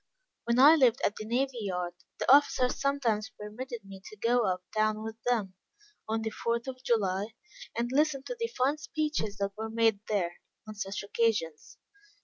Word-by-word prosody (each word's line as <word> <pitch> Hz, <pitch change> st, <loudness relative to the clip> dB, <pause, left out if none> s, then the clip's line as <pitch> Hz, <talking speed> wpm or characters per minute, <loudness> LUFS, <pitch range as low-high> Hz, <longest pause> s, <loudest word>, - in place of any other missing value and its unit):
When 235 Hz, 0 st, +1 dB
I 285 Hz, +5 st, +9 dB
lived 260 Hz, -6 st, +4 dB
at 205 Hz, -, +1 dB
the 215 Hz, -, -7 dB
navy 255 Hz, +2 st, 0 dB
yard, 180 Hz, -3 st, -2 dB, 0.2 s
the -, -, +5 dB
officers 260 Hz, -3 st, +3 dB
sometimes 250 Hz, -7 st, 0 dB
permitted 225 Hz, +1 st, -7 dB
me 195 Hz, -1 st, -11 dB
to 215 Hz, -, -11 dB
go 235 Hz, +1 st, +2 dB
up 185 Hz, 0 st, -4 dB
town 215 Hz, 0 st, +1 dB
with 220 Hz, 0 st, -7 dB
them, 215 Hz, -6 st, +1 dB, 0.6 s
on 220 Hz, 0 st, 0 dB
the 220 Hz, -, -2 dB
fourth 235 Hz, +2 st, -2 dB
of 255 Hz, -1 st, -6 dB
July, 210 Hz, -2 st, 0 dB, 0.4 s
and 240 Hz, +1 st, -1 dB
listen 285 Hz, -1 st, +2 dB
to -, -, -5 dB
the 460 Hz, -, 0 dB
fine 275 Hz, +4 st, +2 dB
speeches 300 Hz, -10 st, -2 dB
that 200 Hz, 0 st, -1 dB
were 220 Hz, +1 st, -4 dB
made 225 Hz, -2 st, +2 dB
there, 180 Hz, -5 st, -1 dB, 0.3 s
on 215 Hz, -, -6 dB
such 205 Hz, -1 st, -4 dB
occasions. 200 Hz, -7 st, -1 dB
225 Hz, 175 wpm, -30 LUFS, 205-255 Hz, 0.6 s, I